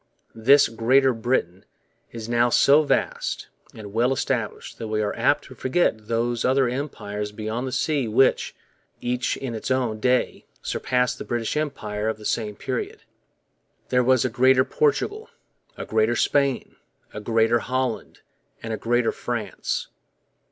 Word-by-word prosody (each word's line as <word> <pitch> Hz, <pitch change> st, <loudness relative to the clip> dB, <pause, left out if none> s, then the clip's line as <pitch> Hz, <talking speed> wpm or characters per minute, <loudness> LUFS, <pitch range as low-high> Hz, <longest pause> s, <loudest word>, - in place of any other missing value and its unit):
This 135 Hz, +6 st, +5 dB
'Greater 130 Hz, +4 st, +3 dB
Britain' 110 Hz, -6 st, -1 dB, 0.5 s
is 115 Hz, -1 st, -7 dB
now 120 Hz, +1 st, +2 dB
so 140 Hz, +5 st, +5 dB
vast 150 Hz, -, -1 dB, 0.3 s
and 105 Hz, -2 st, -9 dB
well 120 Hz, +3 st, +2 dB
established 125 Hz, -4 st, -3 dB
that 115 Hz, -, -4 dB
we 110 Hz, 0 st, -1 dB
are 105 Hz, -1 st, -1 dB
apt 145 Hz, +5 st, +2 dB
to 130 Hz, -, -12 dB
forget 130 Hz, -4 st, 0 dB
those 115 Hz, +1 st, 0 dB
other 130 Hz, 0 st, +3 dB
empires 105 Hz, -6 st, -4 dB
beyond 110 Hz, +4 st, -4 dB
the -, -, -4 dB
seas 140 Hz, -4 st, 0 dB
which, 130 Hz, +5 st, +2 dB, 0.4 s
each 125 Hz, +1 st, -1 dB
in 130 Hz, -3 st, -5 dB
its 110 Hz, -, -5 dB
own 125 Hz, -4 st, 0 dB
day, 125 Hz, +2 st, 0 dB, 0.2 s
surpassed 125 Hz, -1 st, 0 dB
the -, -, -4 dB
British 120 Hz, +1 st, -2 dB
Empire 110 Hz, -8 st, -2 dB
of 110 Hz, -, -3 dB
the 105 Hz, -, -12 dB
same 105 Hz, -2 st, -1 dB
period. -, -, -4 dB, 0.9 s
There 125 Hz, 0 st, +3 dB
was 130 Hz, -1 st, +3 dB
a -, -, +1 dB
Greater 130 Hz, +2 st, +4 dB
Portugal, 440 Hz, 0 st, 0 dB, 0.5 s
a -, -, -5 dB
Greater 110 Hz, +2 st, +1 dB
Spain, 140 Hz, +1 st, 0 dB, 0.4 s
a 105 Hz, -, -6 dB
Greater 115 Hz, +2 st, +2 dB
Holland, 130 Hz, -1 st, -3 dB, 0.4 s
and 115 Hz, -1 st, -4 dB
a -, -, -2 dB
Greater 120 Hz, +1 st, +1 dB
France. -, -, -4 dB
120 Hz, 150 wpm, -24 LUFS, 110-130 Hz, 0.9 s, This